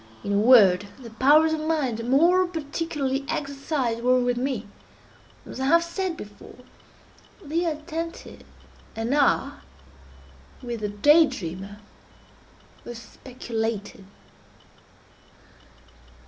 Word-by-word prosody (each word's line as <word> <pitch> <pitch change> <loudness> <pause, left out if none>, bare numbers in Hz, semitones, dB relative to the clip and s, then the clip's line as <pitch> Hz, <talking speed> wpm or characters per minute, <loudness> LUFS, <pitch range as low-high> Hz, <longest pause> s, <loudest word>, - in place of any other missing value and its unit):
In 200 - -2
a - - +2
word, 205 -5 +5
the 235 -3 -11
powers 295 +7 +4
of 315 - -2
mind 270 -8 -2
more 350 +7 +4
particularly 295 -4 -3
exercised 275 -4 -2
were, 255 +1 +3
with 245 0 0
me, 245 -3 -3 0.8
as - - -9
I 265 - -1
have 335 +3 +4
said 340 0 -4
before, 205 -1 -12 0.9
the 330 +4 -1
attentive, 325 +1 -5 0.5
and 225 +4 -2
are, 285 -1 +1 1.0
with 240 -2 -5
the 210 -1 -3
day 295 +10 +5
dreamer, 195 - -7 1.1
the 240 - -8
speculative. 225 -3 -6
260 Hz, 105 wpm, -24 LUFS, 225-310 Hz, 1.1 s, word